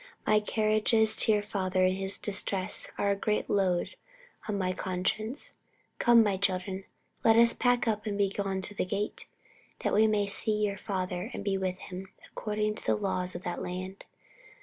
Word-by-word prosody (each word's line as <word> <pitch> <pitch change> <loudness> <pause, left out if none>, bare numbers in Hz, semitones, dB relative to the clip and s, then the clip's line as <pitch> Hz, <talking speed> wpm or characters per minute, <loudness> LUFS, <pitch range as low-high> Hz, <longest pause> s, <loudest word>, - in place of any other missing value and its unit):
My 215 0 +4
carriages 215 +1 +2
to - - +4
your 210 -1 +2
father 185 -3 0
in 185 - +3
his 195 +1 0
distress 195 -1 -1
are 200 - +1
a - - +2
great 210 +1 -1
load 190 - +1 0.6
on 205 - 0
my 185 -1 0
conscience. 195 +8 -3 0.5
Come, 235 -1 +6
my 200 -3 0
children, 190 0 -1 0.4
let 225 -1 +6
us 235 0 +6
pack 245 -1 +1
up 215 -1 -1
and 205 -1 -2
be 200 -1 +2
gone 195 -1 -2
to 190 - -4
the - - -1
gate, 200 +3 -3 0.5
that - - 0
we 220 +2 +5
may 210 -1 +2
see 210 +1 +1
your 200 -1 -3
father 185 -3 -3
and - - -5
be 200 -1 0
with 185 -1 -2
him, 185 +1 -7 0.2
according 210 0 -2
to - - -10
the - - +2
laws 185 -3 -2
of 175 - -6
that 175 - -4
land." 185 +2 -6
200 Hz, 185 wpm, -29 LUFS, 185-215 Hz, 0.6 s, Come